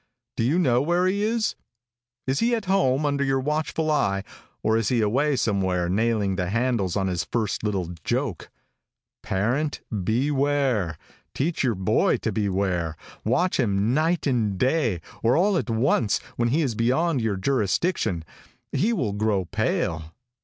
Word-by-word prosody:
"Do 115 - 0
you 140 +9 +2
know 130 -8 +3
where 175 +5 +1
he 195 +2 +1
is? 220 +1 0 0.7
Is 130 +1 0
he 235 +1 +2
at 220 -3 -4
home 155 -7 +2
under 140 -1 +1
your 135 -1 +1
watchful 155 +2 -1
eye, 100 -10 +1 0.4
or 110 - +2
is 115 -2 +1
he 125 - +2
away 130 +7 +2
somewhere 95 -6 0
nailing 105 -1 +1
the 90 -2 -1
handles 115 -4 0
on 100 -2 0
his 90 -2 -1
first 110 -4 -1
little 95 -5 -1
joke? 125 - -2 0.7
Parent, 125 +11 -1
beware. 125 - 0 0.4
Teach 155 +4 0
your 120 -4 +1
boy 95 0 +2
to - - -2
beware. 95 -5 -1 0.3
Watch 175 +12 +1
him 105 -1 +1
night 160 +4 +1
and 115 -8 +1
day, 130 - +1 0.2
or 115 +5 +3
all 195 +3 +3
at 170 - -1
once, 115 -1 +2 0.2
when 120 - +1
he 155 +6 +2
is 130 -5 -1
beyond 130 +6 +1
your 110 -3 0
jurisdiction, 105 - 0 0.5
he 225 +5 +1
will 125 - -1
grow 105 -2 0
pale. 80 -1 -2
120 Hz, 155 wpm, -25 LUFS, 100-145 Hz, 0.7 s, know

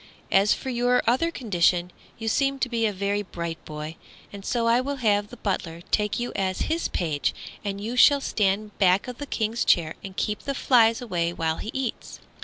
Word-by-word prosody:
As 195 +2 +4
for 265 - -1
your 245 +1 +2
other 255 +9 +2
condition, 180 - +1 0.3
you 225 - -5
seem 275 +4 +1
to 255 -1 -1
be 230 -2 +1
a - - 0
very 200 +1 -1
bright 170 -4 -6
boy, 155 +1 -7 0.4
and 200 -1 -8
so 235 +2 0
I 235 +2 +4
will 280 +2 -3
have 205 -5 +1
the 245 - -12
butler 170 -5 -3
take 210 0 +1
you 240 - -2
as 190 -1 -1
his 330 +1 0
page, 155 -5 -1 0.3
and 200 -1 -3
you 225 +4 -4
shall 285 +3 +7
stand 210 -4 0
back 190 +1 +4
of 250 -1 -7
the 290 - -5
King's 225 -1 -1
chair 160 -2 +3
and 190 -1 -9
keep 210 -1 -1
the 275 - -4
flies 235 -2 +4
away 175 -6 -1
while 160 -1 -1
he - - -6
eats." 265 -3 -4
210 Hz, 205 wpm, -25 LUFS, 185-245 Hz, 0.4 s, shall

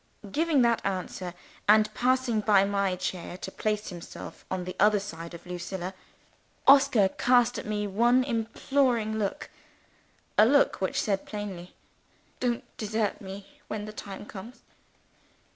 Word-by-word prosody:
Giving 310 -2 +3
that 235 -1 +2
answer, 185 -2 -3 0.3
and 215 0 +5
passing 250 -1 +1
by 200 -2 +5
my 200 -2 0
chair 180 -1 -4
to - - -7
place 215 0 -2
himself 175 -3 -9
on 185 -1 -2
the 185 +1 -6
other 210 +1 +5
side 170 -3 -7
of 170 - -12
Lucilla, 180 +1 -5 0.7
Oscar 270 -7 +6
cast 245 +3 +3
at - - -8
me 210 -1 -1
one 240 +6 +3
imploring 230 -1 0
look 200 -2 -3 0.9
a 215 - +9
look 285 -4 +3
which 190 - 0
said 195 -2 -1
plainly, 195 -4 -6 0.6
"Don't 240 -2 0
desert 215 -1 -1
me 195 0 -8 0.2
when 210 -1 -4
the 215 - -8
time 200 -1 -8
comes!" 220 +5 -10
210 Hz, 140 wpm, -28 LUFS, 190-235 Hz, 0.9 s, a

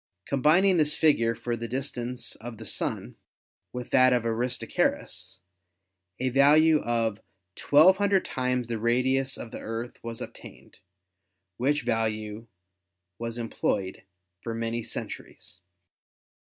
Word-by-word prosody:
Combining 170 +8 +4
this 150 -2 +2
figure 115 -7 +3
for 120 +1 -3
the 115 0 -5
distance 125 -1 -4
of 115 0 -8
the 110 - -10
Sun - - -3 0.5
with 125 -1 -7
that 130 -1 +6
of 120 -2 +1
Aristarchus, 115 -5 -1 0.8
a 130 +1 0
value 150 +4 +5
of 115 -2 -1 0.5
1,200 190 +6 +5
times 125 -2 -1
the 115 -2 -3
radius 130 +3 +1
of 115 - -8
the - - -7
Earth 115 +2 -6
was 115 -1 -5
obtained, - - -11 0.8
which 145 +3 +1
value 110 -1 -2 0.7
was 115 0 -4
em 115 -1 -5
ployed 95 -2 -1 0.4
for 115 -1 -4
many 115 +1 -2
centuries. 95 - -8
120 Hz, 120 wpm, -27 LUFS, 115-135 Hz, 0.8 s, that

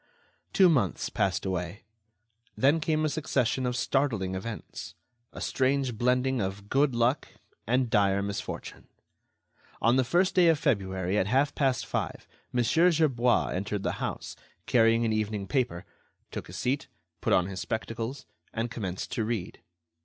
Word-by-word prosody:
Two 190 -2 +6
months 130 - +1
passed 95 -1 0
away. 90 +1 -3 0.7
Then 145 +5 +4
came 155 -1 +1
a - - +3
succession 135 -4 0
of 125 - -1
startling 120 -9 0
events, 105 +3 -6 0.4
a - - -9
strange 135 -2 0
blending 125 +2 +1
of 100 +1 -4
good 135 -1 +2
luck 120 +4 +1 0.4
and 125 +2 +2
dire 100 -3 +2
misfortune! 100 0 -6 0.9
On 120 +3 +3
the 130 - +4
first 180 +8 +2
day 180 -2 +5
of 165 -2 +5
February, 95 - 0
at 95 - +1
half 135 +6 +2
past 135 -5 +1
five, - - -3 0.2
Mon. 120 -1 +1
Gerbois 150 -5 +3
entered 100 +2 -3
the - - 0
house, - - -4 0.3
carrying 115 0 +4
an 110 - +1
evening 105 -2 -1
paper, 115 -9 -1 0.5
took - - -6
a - - -10
seat, 135 +3 -1 0.3
put - - 0
on 90 - +4
his 95 0 -5
spectacles, 115 +5 -4 0.3
and 115 +1 -3
commenced 95 -5 -4
to 115 - -1
read. 110 -5 -3
120 Hz, 150 wpm, -28 LUFS, 100-135 Hz, 0.9 s, Two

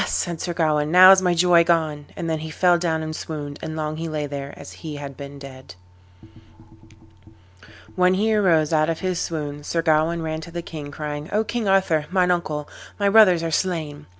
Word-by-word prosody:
said 170 -2 -2
Sir 175 - -3
Gawain, 150 -3 +1
"now 185 +2 +9
is 190 -1 +6
my 180 -1 +1
joy 175 0 +5
gone." 155 -4 0
And 170 - -5
then 160 -1 -1
he 160 +1 -7
fell 175 +2 +2
down 160 -2 -1
and 155 0 -5
swooned, 145 -3 -6
and 155 - -5
long 155 0 -3
he 165 0 -4
lay 150 -1 -3
there 140 -1 -6
as - - -10
he 155 -3 -8
had 140 -1 -8
been 140 +1 -9
dead. 130 -8 -12 2.2
When 185 0 +3
he 220 +3 +1
arose 165 -7 +2
out 155 0 +2
of 165 - -3
his 185 -2 -2
swoon 145 -3 -5
Sir 165 +2 -2
Gawain 160 +1 +1
ran 160 0 -4
to 165 - -10
the 170 0 -6
king, 150 -4 -8
crying, 150 +1 -6
"O 215 +2 +1
King 230 -1 -3
Arthur, 185 -6 +2
mine 180 -1 +2
uncle, 155 -4 -2 0.3
my 200 -1 +1
brothers 195 -5 +5
are 165 - -2
slain." 155 -5 -2
160 Hz, 205 wpm, -22 LUFS, 150-180 Hz, 2.2 s, now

